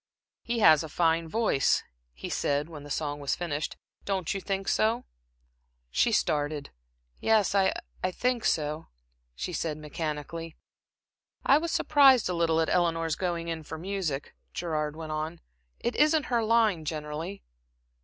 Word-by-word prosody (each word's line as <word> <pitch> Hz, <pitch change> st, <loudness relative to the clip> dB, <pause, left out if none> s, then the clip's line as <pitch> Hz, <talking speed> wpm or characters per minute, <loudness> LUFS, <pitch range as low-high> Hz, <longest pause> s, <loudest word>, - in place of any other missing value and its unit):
"He 235 Hz, 0 st, -2 dB
has 155 Hz, -8 st, +7 dB
a 160 Hz, -, -7 dB
fine 165 Hz, +1 st, +2 dB
voice," 215 Hz, -9 st, +2 dB, 0.3 s
he -, -, -8 dB
said, 145 Hz, +1 st, 0 dB
when 155 Hz, -3 st, -9 dB
the 145 Hz, -, -11 dB
song 145 Hz, 0 st, -2 dB
was 140 Hz, -1 st, -1 dB
finished. 155 Hz, -4 st, -3 dB, 0.3 s
"Don't 190 Hz, -4 st, -1 dB
you 195 Hz, -, -4 dB
think 195 Hz, 0 st, -3 dB
so?" 230 Hz, +3 st, +1 dB, 0.9 s
She 235 Hz, -, +3 dB
started. 150 Hz, -7 st, 0 dB, 0.5 s
"Yes, 220 Hz, -3 st, +3 dB
I 195 Hz, -1 st, +4 dB, 0.3 s
I 185 Hz, -, +2 dB
think 245 Hz, +5 st, -1 dB
so," 155 Hz, +1 st, 0 dB, 0.5 s
she 180 Hz, -, -4 dB
said, 160 Hz, -2 st, -2 dB
mechanically. 155 Hz, +1 st, -5 dB, 0.9 s
"I 280 Hz, -, +6 dB
was 335 Hz, +1 st, -3 dB
surprised 275 Hz, -5 st, +5 dB
a 180 Hz, -, -1 dB
little 165 Hz, -1 st, +2 dB
at 160 Hz, -, +1 dB
Eleanor's 165 Hz, -3 st, +1 dB
going 170 Hz, -2 st, -2 dB
in 165 Hz, -1 st, -3 dB
for 160 Hz, +1 st, -7 dB
music," 175 Hz, -5 st, -3 dB, 0.2 s
Gerard 155 Hz, -3 st, -2 dB
went 160 Hz, -1 st, -6 dB
on. 155 Hz, +2 st, -3 dB, 0.4 s
"It 240 Hz, -, -2 dB
isn't 305 Hz, 0 st, +4 dB
her 235 Hz, -1 st, +3 dB
line, 220 Hz, -7 st, +3 dB
generally." 155 Hz, +5 st, -5 dB
165 Hz, 150 wpm, -28 LUFS, 155-200 Hz, 0.9 s, has